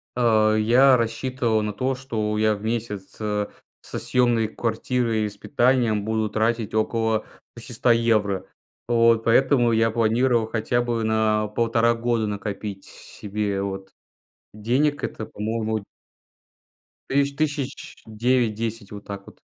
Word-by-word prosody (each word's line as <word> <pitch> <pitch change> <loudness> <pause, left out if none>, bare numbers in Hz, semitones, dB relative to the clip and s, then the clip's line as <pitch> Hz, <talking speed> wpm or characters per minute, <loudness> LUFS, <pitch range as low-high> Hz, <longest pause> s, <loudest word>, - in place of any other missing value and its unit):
Э, 110 -3 +3
я 125 +5 +5
рассчитывал 115 0 -1
на 105 0 -3
то, 130 +5 -1
что 110 -5 -3
я 110 0 +2
в 100 - -11
месяц, 110 -4 -4
э, 105 -1 -1 0.3
со - - -6
съемной 120 -3 +2
квартирой 115 0 -1
и - - -2
с 100 - -14
питанием 120 -4 +1
буду 110 0 -1
тратить 110 +1 -1
около 110 0 0 0.3
600 120 +1 0
евро. 110 -5 +1 0.4
Вот. 115 -1 +4
Поэтому, 120 +1 +3
я 115 0 +2
планировал 115 +1 +2
хотя 115 +2 0
бы 120 -2 -1
на 110 -1 +1
1,5 115 +2 +2
года 115 -1 0
накопить 100 -1 -5
с - - -11 0.3
себе, 100 -1 -2
вот. 95 -1 -5 0.6
Денег 130 +8 0
это 110 - -4
по-моему 110 +1 -2 1.3
тыщ 140 +1 +2
тысяч 145 -3 -3
9-10. 115 -2 -1
Вот 100 0 -9
так 100 -1 -7
вот. - - -15
115 Hz, 130 wpm, -23 LUFS, 105-120 Hz, 1.3 s, я